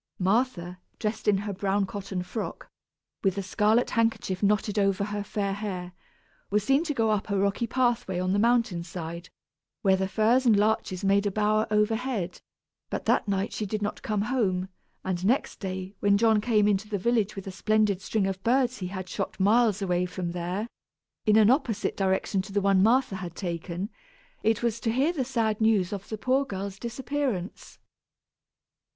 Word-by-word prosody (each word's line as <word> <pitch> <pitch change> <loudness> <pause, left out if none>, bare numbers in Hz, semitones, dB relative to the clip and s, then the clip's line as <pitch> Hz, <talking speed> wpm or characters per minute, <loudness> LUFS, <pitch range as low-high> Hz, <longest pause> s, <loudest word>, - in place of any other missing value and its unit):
Martha, 185 -3 0 0.2
dressed 220 0 -3
in 205 -2 +5
her 205 +1 -3
brown 195 +1 0
cotton 195 -2 -5
frock, 195 +5 -6 0.5
with 190 -2 +2
the 200 - -2
scarlet 215 +4 +2
handkerchief 225 -5 0
knotted 210 +1 +1
over 195 0 +2
her 205 0 -3
fair 200 -2 -2
hair, 190 -3 -5 0.6
was 210 0 +1
seen 270 +6 +3
to 300 -4 -3
go 225 -2 +2
up 210 0 -1
a 200 - +1
rocky 200 +4 0
pathway 240 -7 0
on 185 +1 0
the 200 - +2
mountain 230 -6 +2
side, 170 0 -7 0.5
where 190 -2 +5
the 190 0 -1
firs 225 +6 +3
and 230 -5 +5
larches 205 -3 0
made 200 +1 +3
a - - 0
bower 215 +2 +1
overhead; 215 -3 0 0.5
but - - -4
that - - +2
night 195 0 -1
she 210 - -3
did 210 +1 -3
not 205 - -3
come 210 -5 -1
home, 195 -6 0 0.4
and 180 -1 -2
next 240 +8 +1
day, 190 0 -5
when 200 0 +4
John 220 -1 +4
came 215 -2 +3
into 205 0 0
the 205 - -1
village 215 0 +1
with 195 - -7
a 195 - -5
splendid 210 0 +1
string 205 +1 0
of 190 -1 -3
birds 250 +1 +2
he 180 - -3
had 185 0 -6
shot 180 - -4
miles 210 0 +3
away 180 -1 +1
from 180 -1 -4
there, 180 +5 -3 0.6
in 210 - +5
an 220 +1 +6
opposite 250 -6 0
direction 190 0 0
to 195 +2 -10
the 205 - +1
one 195 -1 +3
Martha 230 -1 +3
had 175 -4 -7
taken, 175 +1 -4 0.5
it 225 +1 +1
was 230 -1 0
to 225 0 0
hear 275 +8 +2
the 280 -6 -1
sad 225 -4 -1
news 210 -3 +3
of 200 -1 -6
the 220 - -4
poor 260 +5 +2
girl's 195 -4 -6
disappearance. 240 -5 -3
205 Hz, 185 wpm, -27 LUFS, 190-225 Hz, 0.6 s, an